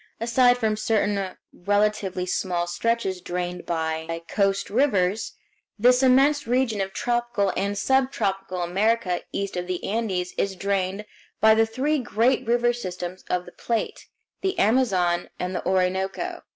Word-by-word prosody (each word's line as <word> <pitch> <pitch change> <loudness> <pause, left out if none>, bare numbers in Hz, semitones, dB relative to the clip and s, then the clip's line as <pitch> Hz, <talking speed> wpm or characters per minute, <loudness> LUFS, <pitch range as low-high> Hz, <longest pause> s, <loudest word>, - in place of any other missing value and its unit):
Aside 245 +2 +4
from 220 -3 0
certain 205 -3 0 0.2
relatively 205 -1 0
small 180 -1 -1
stretches 190 0 -1
drained 180 0 -4
by 160 0 -2
coast 195 -1 0
rivers, 210 -5 +1 0.4
this 250 +4 +5
immense 270 +2 +4
region 240 -4 +1
of 195 0 -3
tropical 240 -3 0
and 200 +1 -1
subtropical 195 -8 0
America 195 +1 +1
east 200 -1 -3
of 180 0 -3
the 180 -1 -3
Andes 195 -5 -2
is 195 -1 0
drained 195 +1 -1 0.3
by 220 0 +6
the 225 0 +3
three 280 +7 0
great 240 +1 +1
river 240 +1 +3
systems 185 -5 -6
of 180 0 -1
the 175 - -11
Plate, 230 +3 -3 0.3
the 385 0 -1
Amazon, 190 -7 +2
and 180 +1 -3
the - - -3
Orinoco. 190 +1 -1
200 Hz, 140 wpm, -24 LUFS, 180-235 Hz, 0.4 s, by